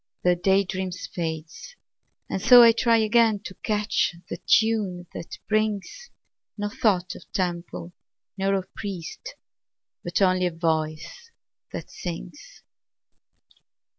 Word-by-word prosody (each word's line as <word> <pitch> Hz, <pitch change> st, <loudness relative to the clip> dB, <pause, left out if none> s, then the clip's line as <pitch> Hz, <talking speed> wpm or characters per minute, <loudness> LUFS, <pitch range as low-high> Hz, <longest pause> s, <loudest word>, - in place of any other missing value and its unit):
The 180 Hz, 0 st, +4 dB
day 190 Hz, +3 st, +3 dB
dream 185 Hz, 0 st, -3 dB
fades 165 Hz, -, -6 dB, 0.5 s
and -, -, -3 dB
so 245 Hz, -1 st, +9 dB
I 230 Hz, -, +8 dB
try 230 Hz, 0 st, +3 dB
Again 220 Hz, -1 st, +3 dB
to 190 Hz, -, -8 dB
catch 210 Hz, -4 st, 0 dB, 0.2 s
the -, -, -3 dB
tune 210 Hz, -6 st, +2 dB
that 170 Hz, -, -7 dB
brings 215 Hz, -, -1 dB, 0.5 s
No 205 Hz, 0 st, -2 dB
thought 195 Hz, -4 st, +1 dB
of -, -, -14 dB
temple 175 Hz, -1 st, -3 dB, 0.4 s
nor 195 Hz, 0 st, +1 dB
of 190 Hz, -1 st, -4 dB
priest, 200 Hz, -, -7 dB, 0.7 s
But 175 Hz, -, -1 dB
only 185 Hz, -2 st, +3 dB
of 170 Hz, -, -5 dB
a -, -, -17 dB
voice 155 Hz, -2 st, -2 dB, 0.4 s
that -, -, -7 dB
sings. -, -, -8 dB
190 Hz, 125 wpm, -25 LUFS, 175-215 Hz, 0.7 s, so